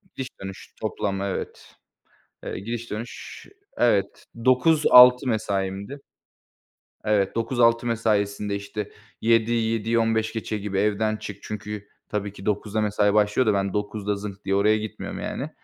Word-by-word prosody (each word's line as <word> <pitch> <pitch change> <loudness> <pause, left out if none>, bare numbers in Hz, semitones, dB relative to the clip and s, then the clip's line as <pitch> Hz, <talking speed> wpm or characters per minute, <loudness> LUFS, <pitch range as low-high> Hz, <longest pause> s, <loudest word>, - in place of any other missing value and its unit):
Gidiş-dönüş 95 -7 -8
toplam, 100 -2 -2
evet. 100 -1 -5 0.7
Eee, - - -4
gidiş-dönüş, 115 +1 -6 0.3
evet. 100 -5 +1 0.2
9:00-18:00 130 -1 +7
mesaimdi. 100 +2 -2 1.1
Evet, 105 -2 +1
9:00-18:00 115 0 +2
mesaisinde, 105 -3 0
işte, 100 +1 -6 0.3
7:00'yi, 115 0 +2
7:15 115 -1 0
gibi 100 -1 -3
evden 105 +1 +1
çık. 100 -2 -8
Çünkü 105 -1 -6 0.2
tabii 105 -1 -3
ki, 100 -1 -11
9:00'da 105 +1 -1
mesai 105 -1 +2
başlıyor 105 +4 +3
da, 105 - +3
ben 100 -1 0
9:00'da 105 0 -2
zınk 100 0 -8
diye 95 - 0
oraya 105 +2 +3
gitmiyorum 110 0 -6
yani. - - -4
105 Hz, 120 wpm, -24 LUFS, 100-115 Hz, 1.1 s, 9:00-18:00